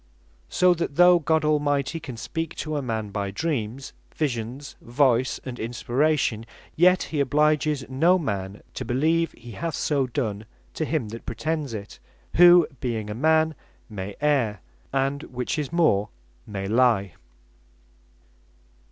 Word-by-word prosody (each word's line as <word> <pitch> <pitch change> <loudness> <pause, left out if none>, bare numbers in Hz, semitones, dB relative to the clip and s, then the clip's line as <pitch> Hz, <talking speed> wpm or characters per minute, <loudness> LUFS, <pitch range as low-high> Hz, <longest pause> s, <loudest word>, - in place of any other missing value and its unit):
So 180 0 +4
that 165 -4 -3
though 175 +1 +6
God 160 -1 +1
Almighty 145 0 +1
can 130 -7 -8
speak 165 +6 -4
to 155 0 -4
a 145 - -1
man, 110 -5 -3
by 100 -1 -2
Dreams, 130 - -3 0.2
Visions, 130 -1 -3
Voice, 125 0 +1
and 125 -2 -6
Inspiration; 120 0 0 0.3
yet 180 +2 +4
he 155 - -4
obliges 150 0 +1
no 165 +8 +3
man 100 - -4
to - - -4
beleeve 160 +8 +1
he 120 0 -12
hath 165 +6 -4
so 140 -3 0
done 110 -5 -3 0.3
to 160 - -2
him 145 -9 -2
that 115 +2 -9
pretends 150 0 -3
it; 100 -1 -8 0.4
who 175 -1 +8
(being 110 -4 -3
a - - -2
man), 160 +5 +2 0.4
may 100 -1 -6
erre, 135 -8 +1 0.3
and 135 +1 0
(which 125 +5 -3
is 150 0 -3
more) 130 - +2 0.4
may 95 -2 -4
lie. 110 -5 +2
135 Hz, 140 wpm, -25 LUFS, 115-155 Hz, 0.4 s, who